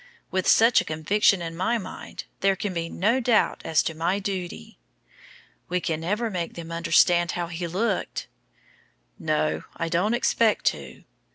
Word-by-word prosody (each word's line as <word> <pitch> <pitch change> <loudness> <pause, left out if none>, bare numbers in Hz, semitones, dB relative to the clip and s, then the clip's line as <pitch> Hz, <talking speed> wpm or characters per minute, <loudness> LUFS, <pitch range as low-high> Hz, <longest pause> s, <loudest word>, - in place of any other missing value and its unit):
With 185 0 -1
such 230 +2 +6
a - - -7
conviction 175 +4 +2
in 165 0 -5
my 225 +7 0
mind, 190 -5 -8 0.2
there 195 0 +3
can 195 0 -3
be 165 -1 -3
no 225 +10 +1
doubt 235 -3 +2
as 160 - +2
to 160 - -2
my 170 +4 0
duty." 185 - -5 0.9
"We 180 +1 +1
can 160 -3 -2
never 210 +7 -1
make 175 -3 -4
them 165 -1 -8
understand 170 +1 +3
how 175 -1 -2
he 170 +1 -5
looked." 195 +4 -2 0.9
"No. 155 0 0
I 165 -1 -2
don't 195 +8 +1
expect 230 -2 +2
to." 70 -3 -11
180 Hz, 160 wpm, -25 LUFS, 165-205 Hz, 0.9 s, such